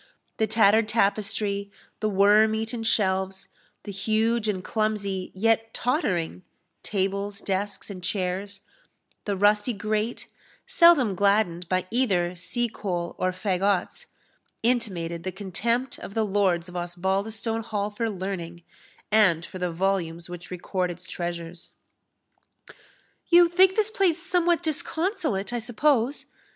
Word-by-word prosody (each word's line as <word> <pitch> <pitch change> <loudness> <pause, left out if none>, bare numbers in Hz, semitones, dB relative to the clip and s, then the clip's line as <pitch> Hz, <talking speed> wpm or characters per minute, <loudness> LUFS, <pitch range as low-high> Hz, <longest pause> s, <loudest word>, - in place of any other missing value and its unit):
The 220 - +1
tattered 220 0 +4
tapestry, 200 -1 0 0.3
the 215 - 0
worm 210 +2 +5
eaten 225 +1 -3
shelves, 190 -3 0 0.3
the 205 - -6
huge 220 +3 0
and 190 -3 -1
clumsy, 205 -4 -2
yet 225 +2 +1
tottering, 185 - -1 0.4
tables, 200 0 -2
desks, 200 +1 -3
and 185 -2 -9
chairs, 195 +1 -2 0.6
the 200 -2 -1
rusty 210 +4 +3
grate, 215 +2 -2 0.4
seldom 310 - +5
gladdened 190 -3 +1
by 185 0 +1
either 190 -8 +1
sea 235 +7 -1
coal 175 -6 -4
or 185 - +1
faggots, 190 0 -1 0.6
intimated 190 -9 0
the 185 +2 -4
contempt 215 +7 -2
of 200 - -9
the 220 -1 +2
lords 190 -4 +1
of 180 - -10
Osbaldistone 195 +6 -2
Hall 210 -2 -3
for 225 +2 -2
learning, 180 -4 -5 0.5
and 190 -6 +4
for 185 - -9
the 180 0 -1
volumes 170 -2 -1
which 175 0 -9
record 180 0 -2
its 175 +1 -8
treasures. 170 -1 -6 1.5
"You 345 0 +7
think 370 +2 +4
this 435 -1 +2
place 370 -6 +2
somewhat 350 -1 +1
disconsolate, 310 - -1
I 240 - 0
suppose?" 245 +3 +1
205 Hz, 125 wpm, -25 LUFS, 185-225 Hz, 1.5 s, You